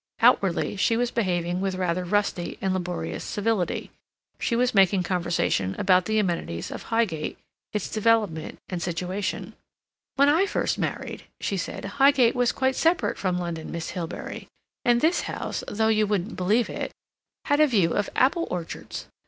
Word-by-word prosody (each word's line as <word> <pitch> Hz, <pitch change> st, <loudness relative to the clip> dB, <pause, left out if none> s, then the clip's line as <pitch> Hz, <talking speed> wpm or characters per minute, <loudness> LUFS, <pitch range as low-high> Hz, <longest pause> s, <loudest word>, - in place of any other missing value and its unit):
Outwardly, 205 Hz, -6 st, +3 dB
she 225 Hz, +4 st, +2 dB
was 245 Hz, 0 st, 0 dB
behaving 180 Hz, -4 st, 0 dB
with 195 Hz, -1 st, -1 dB
rather 180 Hz, -1 st, 0 dB
rusty 180 Hz, -2 st, -1 dB
and 190 Hz, -1 st, 0 dB
laborious 180 Hz, -1 st, -3 dB
civility. 205 Hz, -3 st, -1 dB, 0.5 s
She 235 Hz, -, 0 dB
was 245 Hz, +1 st, +2 dB
making 195 Hz, -2 st, +4 dB
conversation 170 Hz, -, 0 dB
about 185 Hz, -2 st, +4 dB
the 220 Hz, +2 st, 0 dB
amenities 170 Hz, -, -1 dB
of -, -, -6 dB
Highgate, 220 Hz, -10 st, 0 dB, 0.3 s
its 210 Hz, -3 st, -2 dB
development 215 Hz, -7 st, +1 dB
and 180 Hz, -2 st, -4 dB
situation. 180 Hz, +3 st, -3 dB, 0.6 s
"When 280 Hz, +1 st, +5 dB
I 330 Hz, +7 st, +4 dB
first -, -, -1 dB
married," -, -, -3 dB
she 200 Hz, -, -1 dB
said, 185 Hz, -, -4 dB
"Highgate 265 Hz, +3 st, +4 dB
was 245 Hz, -1 st, +2 dB
quite 265 Hz, 0 st, 0 dB
separate 330 Hz, +5 st, +1 dB
from 185 Hz, -2 st, 0 dB
London, 170 Hz, -3 st, -4 dB
Miss 170 Hz, -1 st, -4 dB
Hilbery, 175 Hz, -1 st, -6 dB, 0.4 s
and 240 Hz, 0 st, +3 dB
this 335 Hz, +3 st, +3 dB
house, -, -, -4 dB
though 220 Hz, +1 st, +1 dB
you 215 Hz, -1 st, +3 dB
wouldn't 200 Hz, +1 st, -1 dB
believe 210 Hz, +6 st, +2 dB
it, -, -, -4 dB, 0.5 s
had 290 Hz, 0 st, +2 dB
a 305 Hz, -, +6 dB
view 195 Hz, -, +2 dB
of 205 Hz, -, 0 dB
apple 310 Hz, +6 st, +3 dB
orchards. 175 Hz, -2 st, -5 dB
200 Hz, 160 wpm, -25 LUFS, 180-230 Hz, 0.6 s, a